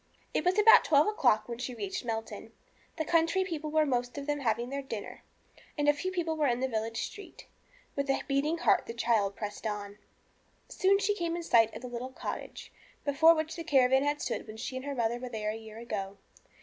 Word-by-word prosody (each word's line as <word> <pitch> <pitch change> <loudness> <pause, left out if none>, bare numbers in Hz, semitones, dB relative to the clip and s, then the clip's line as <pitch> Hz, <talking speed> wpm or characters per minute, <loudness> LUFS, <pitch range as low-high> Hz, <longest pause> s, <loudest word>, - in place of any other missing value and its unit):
It - - 0
was 360 +3 +2
about 445 +3 +8
twelve 295 -1 +4
o'clock 250 - +2
when 235 -1 -6
she 250 0 -4
reached 380 +4 -4
Melton. 225 -1 -5 0.4
The 315 - -1
country 330 +4 +2
people 320 -4 -4
were 310 0 +3
most 245 -1 -1
of 280 - -4
them 295 0 -1
having 235 -1 -1
their 280 0 -2
dinner, 230 -6 -7 0.6
and 295 0 0
few 370 +5 -3
people 340 -3 -1
were 305 -2 +1
in 240 -1 +1
the 265 - 0
village 225 -1 -2
street. 410 - -11 0.5
With 280 0 -2
a 270 - +1
beating 290 +4 +1
heart - - +2
the 230 - -6
child 220 -4 +1
pressed 210 +1 -5
on. 205 -1 -5 0.7
Soon 390 +1 +3
she 405 +1 +1
came 340 -4 -2
in 345 - -4
sight 225 -7 +4
of - - -8
the - - -5
little 245 +1 -5
cottage, 260 - -7 0.3
before 320 +4 +6
which 315 +1 -3
the 335 - -5
caravan 265 -3 +4
had 290 +1 -1
stood - - -3
when 215 0 -9
she 255 - -5
and 260 +1 -5
her 285 -1 -3
mother 235 -1 0
were 250 0 -6
there 215 -2 -2
a - - -5
year 220 -1 -10
ago. 200 -4 -5
270 Hz, 215 wpm, -30 LUFS, 230-320 Hz, 0.7 s, about